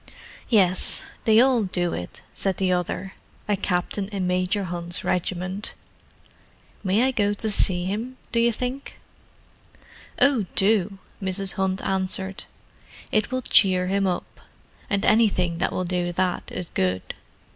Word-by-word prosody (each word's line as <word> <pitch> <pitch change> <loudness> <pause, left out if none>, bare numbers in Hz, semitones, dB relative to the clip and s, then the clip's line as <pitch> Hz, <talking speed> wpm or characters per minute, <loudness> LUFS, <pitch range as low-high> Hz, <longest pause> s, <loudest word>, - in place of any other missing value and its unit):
"Yes—they 215 +2 +4
all 255 -1 +4
do 180 -3 -1
it," 90 - -7
said 190 -2 -2
the 190 -1 +1
other—a 190 +3 -4
captain 190 +1 -2
in 195 -3 -3
Major 185 +3 0
Hunt's 175 -1 -4
regiment. 185 +3 -2 1.1
"May 200 +4 +2
I 265 - +2
go 205 -4 0
to 215 +1 -3
see 180 -3 +3
him, 225 +7 -4
do 235 - +1
you 235 0 +3
think?" 250 +4 -4 1.2
"Oh, 260 -9 +3
do," 200 -1 +2 0.2
Mrs. 190 0 +3
Hunt 190 0 -1
answered. 190 0 -1 0.7
"It 215 -1 +1
will 255 0 -2
cheer 185 -5 +4
him 195 0 +1
up; 180 -1 -4 0.5
and 200 0 0
anything 185 -7 +2
that - - 0
will 185 - -2
do 175 0 -1
that 185 0 -2
is 180 - -4
good. 95 0 -1
190 Hz, 135 wpm, -24 LUFS, 180-210 Hz, 1.2 s, Yes—they